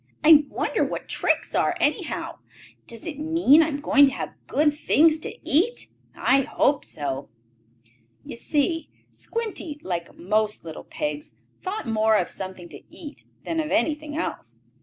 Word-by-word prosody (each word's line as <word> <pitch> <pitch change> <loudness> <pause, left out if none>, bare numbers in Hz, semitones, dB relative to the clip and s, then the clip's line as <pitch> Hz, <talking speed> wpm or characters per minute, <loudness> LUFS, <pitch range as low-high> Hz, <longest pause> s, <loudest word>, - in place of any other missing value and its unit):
"I 305 -1 +8
wonder - - -1
what - - -4
tricks - - 0
are, - - +2
anyhow? - - -1 0.5
Does 230 -2 -9
it 300 -4 -6
mean 320 -1 +5
I 315 - +2
am 285 -2 -4
to 285 -2 +6
have - - -5
good 295 0 +2
things 310 +1 +3
to - - -5 0.2
eat? 430 - +1 0.3
I 270 +1 +3
hope 275 +1 +1
so." 140 -3 -5 1.0
You - - -7
see 315 +7 -1 0.2
Squinty, 420 -10 -5
like 170 -2 -4
most 210 +1 0
little 160 -1 -8
pigs, 300 -2 -5 0.3
thought 390 0 -4
more 220 -1 +3
of 180 - 0
something 185 -2 -7
to - - -10
eat 295 -2 -11 0.2
than 330 - -1
of 310 -1 -1
anything 300 +3 0
else. 330 - -5
295 Hz, 150 wpm, -24 LUFS, 220-320 Hz, 1.0 s, I